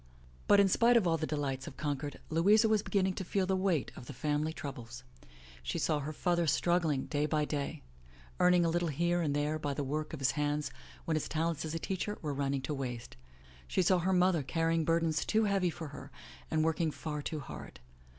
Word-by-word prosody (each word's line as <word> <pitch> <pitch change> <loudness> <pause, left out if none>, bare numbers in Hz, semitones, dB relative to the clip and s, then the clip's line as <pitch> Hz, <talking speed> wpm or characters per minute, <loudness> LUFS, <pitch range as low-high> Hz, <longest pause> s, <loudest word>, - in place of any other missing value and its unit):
But 205 - +6
in 200 - +6
spite 235 +5 +5
of 220 - +2
all 165 -1 +2
the 155 - -2
delights 135 -3 -2
of 140 - -9
Concord, 145 0 -3
Louisa 205 +8 +5
was 215 -1 +3
beginning 190 -2 +1
to 190 - -4
feel 190 +2 0
the 190 +1 +1
weight 185 -6 0
of 125 - -10
the - - -7
family 150 +4 -1
troubles. 125 -5 -7 0.6
She 65 0 -3
saw 150 - +1
her 145 +2 -4
father 170 +1 0
strug 175 +4 +3
gling 150 -5 -1
day 150 0 0
by 150 -1 +1
day, 145 - -3 0.6
earning 180 -1 +5
a - - +2
little 175 +1 0
here 170 +4 +1
and 145 -3 0
there 150 +1 0
by 145 -2 -2
the 145 - -2
work 150 +3 -3
of 160 - -6
his 135 -1 +2
hands 150 0 -1 0.3
when 165 - 0
his 155 - -1
talents 165 0 -1
as 160 +1 -4
a - - +1
teacher 195 +4 -3
were 150 -2 -1
running 140 -1 -1
to 140 - -2
waste. 125 -4 -5 0.5
She 185 - +1
saw 180 +1 +4
her 185 +2 +1
mother 180 -3 +3
carrying 165 +3 0
burdens 165 -2 +1
too 220 0 +2
heavy 195 -3 +2
for 160 -2 -6
her 140 -1 -9 0.4
and 155 0 +1
working 160 0 +1
far 150 0 -4
too 155 +1 -4
hard. 130 - -9
155 Hz, 220 wpm, -32 LUFS, 145-175 Hz, 0.6 s, But